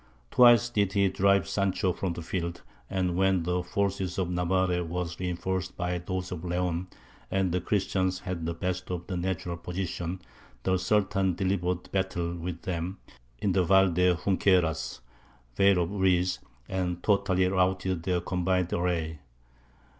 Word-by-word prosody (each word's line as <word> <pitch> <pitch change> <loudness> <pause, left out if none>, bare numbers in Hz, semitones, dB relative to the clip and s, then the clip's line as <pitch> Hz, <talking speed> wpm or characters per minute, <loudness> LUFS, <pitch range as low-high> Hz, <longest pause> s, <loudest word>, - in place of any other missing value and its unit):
Twice 120 -1 +7
did 100 -4 +1
he 100 -1 +3
drive 100 -2 +3
Sancho 95 -2 0
from 90 -1 -2
the 85 - -6
field, 85 0 -4 0.3
and 90 -2 0
when 95 -1 +2
the 90 +1 0
forces 95 -1 -1
of 90 -2 -1
Navarre 90 0 +1
were 90 +2 -2
reinforced 90 +1 -3
by 90 0 -1
those 90 +1 -4
of 90 -2 -5
Leon, 90 0 -1 0.4
and 95 -2 +1
the 90 +1 0
Christians 95 -1 0
had 90 -4 -4
the 85 - -2
best 90 +1 -3
of 90 -1 -4
the 95 - -4
natural 90 -1 -2
position, 90 0 -4 0.4
the 95 0 +2
Sultan 95 -1 +1
delivered 90 -1 -1
battle 90 -3 -1
with 85 0 -5
them 90 0 -3 0.4
in 100 - 0
the 95 0 +3
Val 95 +1 +5
de 90 +1 +3
Junqueras 90 -6 +1 0.5
(Vale 95 +1 +4
of 85 - -4
Reeds), 90 -2 +2 0.3
and 90 -2 -2
totally 100 -3 +2
routed 95 -1 +1
their 90 0 0
combined 90 0 0
array. 85 -3 -1
90 Hz, 150 wpm, -28 LUFS, 90-95 Hz, 0.5 s, Twice